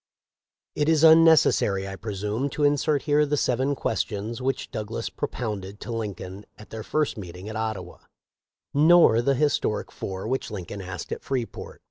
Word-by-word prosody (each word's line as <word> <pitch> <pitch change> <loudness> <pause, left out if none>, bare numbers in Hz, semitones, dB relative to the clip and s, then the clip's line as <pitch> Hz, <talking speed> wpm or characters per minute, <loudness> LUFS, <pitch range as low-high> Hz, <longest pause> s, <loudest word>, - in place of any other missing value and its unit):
It 150 +1 0
is 160 -1 +3
unnecessary, 160 -12 +5
I 95 - -6
presume, 105 +6 -3
to 150 - +1
insert 145 0 +2
here 150 0 +3
the 150 0 0
seven 130 +2 +1
questions 110 0 -3
which 135 +1 -2
Douglas 110 0 -4
propounded 105 -4 -5
to - - -6
Lin 110 -4 -3
coln 95 +2 -9
at 105 - -14
their 110 - -6
first 150 +3 -1
meeting 90 +1 -9
at 110 - -6
Ottawa, 110 -5 -4 0.7
nor 155 -5 +6
the 135 +3 +2
his 145 +2 +2
toric 105 - -3
four 95 +1 -6
which 130 +3 -2
Lincoln 100 -1 -6
asked 90 -4 -7
at - - -4
Freeport. 130 -4 -5
115 Hz, 165 wpm, -25 LUFS, 100-145 Hz, 0.7 s, nor